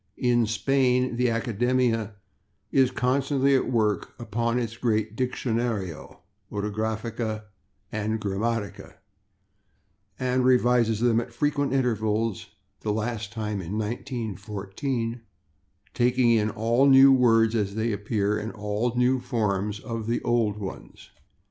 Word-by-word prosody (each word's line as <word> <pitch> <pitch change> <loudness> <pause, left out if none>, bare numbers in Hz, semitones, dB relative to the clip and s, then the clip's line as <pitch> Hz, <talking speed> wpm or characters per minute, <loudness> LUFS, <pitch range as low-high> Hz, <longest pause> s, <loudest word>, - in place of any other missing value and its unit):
In 120 -2 +2
Spain 125 +1 +1
the 125 0 +2
Academia 115 -1 0 0.6
is 130 -2 +4
constantly 135 +2 +1
at 130 - +1
work 110 -4 0
upon 115 +1 -1
its 115 -2 -2
great 110 -2 -1
Diccionario, 115 - -3 0.3
Ortografía 110 +1 -3 0.5
and 110 +1 -2
Gramática, 105 +1 -3 1.2
and 130 0 +1
revises 120 -3 +3
them 120 -1 +3
at 120 - -9
frequent 145 +2 0
intervals 110 -5 0 0.3
(the 105 - -2
last 110 0 -3
time 105 -3 -3
in 95 +4 -4
1914), 115 +1 -4 0.7
taking 125 0 +3
in 110 -2 +3
all 115 +6 +2
new 135 0 +8
words 115 -3 +4
as 105 -3 -1
they 110 +1 0
appear 105 0 -1
and 110 +2 -5
all 105 +2 -2
new 125 +1 +3
forms 105 -5 -1
of 115 -1 -5
old 115 -3 +1
ones. 100 -3 -9
115 Hz, 115 wpm, -26 LUFS, 105-125 Hz, 1.2 s, new